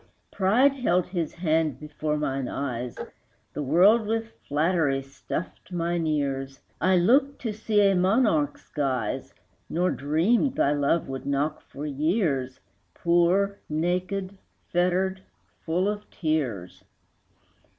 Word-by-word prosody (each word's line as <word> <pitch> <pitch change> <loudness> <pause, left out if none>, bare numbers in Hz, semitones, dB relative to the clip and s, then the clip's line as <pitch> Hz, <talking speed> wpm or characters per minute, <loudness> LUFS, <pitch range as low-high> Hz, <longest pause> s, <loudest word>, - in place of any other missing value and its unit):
Pride 230 +9 +3
held 185 -10 +1
his 175 -4 -3
hand 160 -5 0
before 150 0 -3
mine 135 -3 -2
eyes, 125 -3 -4 0.6
The - - -3
world 190 - +4
with 225 +1 -2 0.2
flattery 145 -2 +1
stuffed 100 - -7
mine 170 -1 -1
ears; 135 -3 -2 0.2
I 185 0 +4
looked 265 +10 +3
to 225 -3 -2
see 210 0 +1
a 195 - +4
monarch's 185 - +2
guise, 135 -5 -2 0.3
Nor 180 +2 +1
dreamed 170 - +1
thy 145 - +2
love 145 +3 +1
would 135 0 -6
knock 145 +2 -1
for 145 - -8
years, 145 - 0 0.4
Poor, 180 +4 +2
naked, 185 +4 -2 0.3
fettered, 185 +2 +1 0.4
full 175 +4 +1
of 210 0 -4
tears. 130 - -2
165 Hz, 120 wpm, -26 LUFS, 140-190 Hz, 0.6 s, world